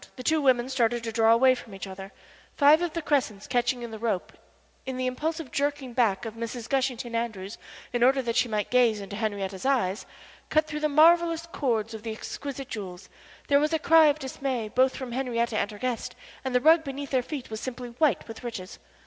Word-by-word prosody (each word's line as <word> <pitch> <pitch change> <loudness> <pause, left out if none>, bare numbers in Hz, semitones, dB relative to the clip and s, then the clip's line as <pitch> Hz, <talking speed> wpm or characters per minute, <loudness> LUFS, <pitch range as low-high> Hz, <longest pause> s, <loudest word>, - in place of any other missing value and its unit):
The 255 - -8
two 315 +3 +2
women 255 -3 +3
started 240 -3 0
to 225 - -3
draw 225 0 +4
away 255 +3 +6
from 230 -5 -9
each 195 - -6
other; 190 0 -9 0.5
five 295 +3 +6
of 345 -3 -2
the 335 - -3
crescents 250 -9 0
catching 245 0 0
in 235 - -6
the 220 - -7
rope, 215 -5 -2 0.5
in 260 -1 -5
the 255 - -1
impulsive 305 +3 -3
jerking 285 -3 -2
back 230 -4 +1
of 225 - -5
Mrs. 230 +1 -6
Gushington 255 -3 -1
Andrews 220 -4 -4 0.3
in 240 - 0
order 265 +2 +4
that 230 -1 -2
she 245 - +2
might 210 -2 -2
gaze 240 -4 +4
into 200 0 -7
Henrietta's 200 -3 -3
eyes, 235 -8 0 0.4
cut 310 0 +3
through 300 -1 -5
the 305 0 +1
marvellous 330 +2 +4
cords 230 -9 -1
of 220 - -7
the 225 0 -5
exquisite 275 +4 -6
jewels. 185 -3 -7 0.4
There 280 0 +5
was 305 +2 0
a - - +4
cry 320 0 +6
of 295 0 +2
dismay 265 -5 -3
both 260 +3 +2
from 260 -2 -6
Henriette 235 -2 -1
and 205 -1 0
her 210 - -9
guest, 250 0 -3 0.3
and 260 -1 -3
the 250 - +4
rug 320 +3 +6
beneath 280 -1 -6
their 260 -2 +2
feet 265 -2 -7
was 220 - -5
simply 250 -1 -6
white 250 - +1
with 225 +1 -9
riches. 220 -6 -7
250 Hz, 215 wpm, -27 LUFS, 225-280 Hz, 0.5 s, away